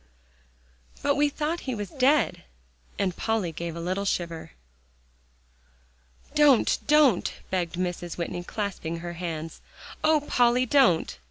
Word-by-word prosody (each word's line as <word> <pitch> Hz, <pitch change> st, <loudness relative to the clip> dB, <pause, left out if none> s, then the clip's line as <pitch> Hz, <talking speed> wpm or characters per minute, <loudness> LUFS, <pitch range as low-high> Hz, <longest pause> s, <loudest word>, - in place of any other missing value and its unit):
"But 285 Hz, -, +3 dB
we 290 Hz, +1 st, +2 dB
thought 305 Hz, +4 st, -2 dB
he 255 Hz, -, -1 dB
was 205 Hz, -3 st, -5 dB
dead," 280 Hz, +3 st, +2 dB, 0.5 s
and 185 Hz, -3 st, -1 dB
Polly 220 Hz, -6 st, -1 dB
gave 170 Hz, +1 st, -5 dB
a -, -, -6 dB
little 185 Hz, +4 st, -2 dB
shiver. 170 Hz, -, -3 dB, 1.8 s
"Don't 295 Hz, -5 st, +4 dB
don't," 295 Hz, -9 st, +4 dB, 0.2 s
begged 180 Hz, -2 st, -1 dB
Mrs. 175 Hz, -1 st, -3 dB
Whitney, 175 Hz, 0 st, -4 dB
clasping 175 Hz, -5 st, -4 dB
her 175 Hz, 0 st, -5 dB
hands; 165 Hz, -2 st, -6 dB, 0.4 s
"Oh, 310 Hz, -1 st, +4 dB
Polly! 245 Hz, +1 st, +3 dB
don't." 230 Hz, -, +3 dB
195 Hz, 120 wpm, -26 LUFS, 170-270 Hz, 1.8 s, Don't